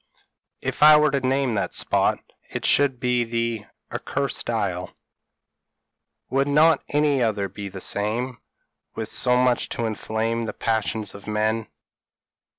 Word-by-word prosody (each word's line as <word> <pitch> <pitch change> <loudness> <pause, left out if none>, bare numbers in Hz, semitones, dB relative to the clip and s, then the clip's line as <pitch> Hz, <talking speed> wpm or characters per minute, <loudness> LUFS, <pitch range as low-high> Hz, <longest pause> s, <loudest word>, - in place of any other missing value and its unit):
p> - - -7
"If - - -7
I 150 0 +9
were 150 -1 +3
to 140 - +1
name 130 -1 +1
that 100 - -1
spot, - - +2 0.3
it - - -4
should 135 -3 +3
be 125 -1 +1
the 115 -2 -2 0.3
'Accursed 140 -1 -3
Isle 100 -6 -1 0.7
.'" 75 0 -58
"Would 135 +1 +2
not 155 +1 +4
any 145 -2 +2
other 105 -4 0
be 100 +1 -7
the 95 -1 -7
same, 115 +7 -2 0.6
with 110 -1 -4
so 125 -1 +2
much 125 -1 +2
to 115 - -2
inflame 110 +1 -2
the - - -4
passions 110 -2 -1
of 100 +1 -12
men?" 110 +1 0
115 Hz, 150 wpm, -24 LUFS, 105-135 Hz, 0.7 s, I